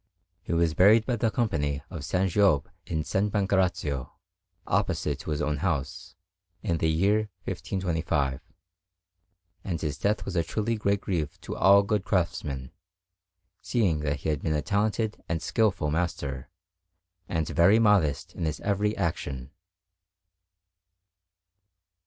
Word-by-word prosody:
He - - -7
was 85 -1 +2
buried 105 +6 +6
by 125 -2 0
the 115 +1 +1
Company 75 - -1
of 85 - -5
S. 90 +6 0
Giobbe 100 -9 +3 0.2
in 80 -2 -1
S. - - -7
Pancrazio, 95 -9 0 0.5
opposite - - 0
to - - -7
his 75 -1 -1
own 75 -1 0
house, 75 -4 -3 0.5
in 85 -6 0
the 80 - +2
year 100 +7 +2
1525; 85 -8 -1 1.2
and 85 -4 -3
his 75 -2 -3
death 105 +1 0
was 85 -2 0
truly 110 +6 -1
a - - -2
great 100 -1 +1
grief 80 -6 -3
to - - -6
all 100 +1 +6
good 105 -1 0
craftsmen, 75 -9 -1 0.9
seeing 95 -10 +1
that 75 -1 -2
he - - -2
had 75 -3 -1
been 80 -2 0
a 75 - -1
talented 105 +3 -1
and 80 0 0
skilful 95 -7 +1
master, 75 -5 -2 0.8
and 80 -3 -1
very 90 +6 +5
modest 90 -7 +2
in 85 - -3
his 75 -2 -2
every 105 +1 0
action. 70 -8 -3
85 Hz, 135 wpm, -27 LUFS, 75-100 Hz, 1.2 s, buried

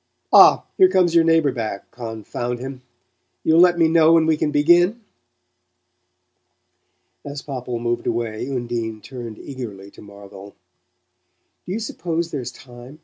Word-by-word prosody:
Ah, - - +7
here 375 -1 +6
comes 180 - +2
your 170 -1 +5
neighbour 165 -3 +3
back, 110 -5 -6
confound 120 +1 -5
him 130 +1 -8 0.6
You'll 160 +1 +3
let 175 0 +5
me 165 -1 +4
know 160 0 +4
when 165 -1 +4
we 160 0 +2
can 150 - -1
begin?" 175 +9 +3 2.2
As 140 0 -7
Popple 125 -3 -5
moved 120 0 -3
away 115 0 -3
Undine 120 -4 -4
turned 120 -4 -9
eagerly 105 -8 -9
to - - -16
Marvell. 100 -1 -13 1.1
"Do - - -5
you 215 - -2
suppose 170 -6 -4
there's 125 -4 -5
time? 125 +3 -14
130 Hz, 140 wpm, -21 LUFS, 115-165 Hz, 2.2 s, Ah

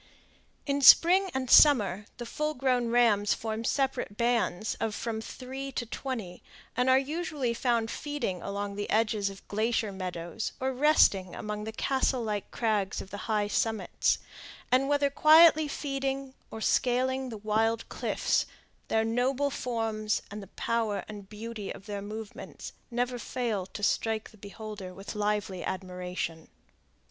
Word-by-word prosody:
In 280 0 0
spring 365 +8 +7
and 260 -1 -1
summer, 215 -8 +6
the 240 - -6
full 300 +5 -2
grown 250 -2 +1
rams 225 -4 +3
form 220 0 -4
separate 265 -5 -1
bands 235 -4 0
of 225 -1 -2
from 225 -1 -3
three 265 +4 -7
to 240 - -2
twenty, 225 -7 -5 0.3
and 250 +2 +2
are 260 - +6
usually 290 -3 -2
found 235 -2 0
feeding 290 - -3
along 200 0 -4
the 205 - -3
edges 215 -2 +1
of 195 -1 -12
glacier 220 0 0
meadows, 180 +1 -5
or 265 0 -1
resting 250 - +3
among 210 0 -5
the 220 - -4
castle 260 +1 0
like 210 -2 -3
crags 210 -4 -1
of 195 - -9
the 205 +3 -7
high 210 -1 +1
summits; 220 +1 0 0.5
and 265 +2 +3
whether 285 -1 +2
quietly 315 +1 +7
feeding, 275 -2 -3 0.2
or 220 - -8
scaling 260 +2 +1
the 225 - -6
wild 220 +2 0
cliffs, - - 0 0.4
their 220 0 +1
noble 255 +5 +1
forms 220 -4 -2
and 210 +1 -6
the 195 - -10
power 225 0 -2
and 205 -2 -9
beauty 215 -1 -6
of 195 - -10
their 205 -2 -5
movements 215 +1 -8 0.2
never 245 0 -1
fail 225 -5 -2
to 205 - -9
strike 220 +1 0
the 215 - -18
beholder 200 -2 -8
with 195 +1 -7
lively 205 -3 -1
admiration. 180 -3 -4
225 Hz, 150 wpm, -29 LUFS, 205-260 Hz, 0.5 s, spring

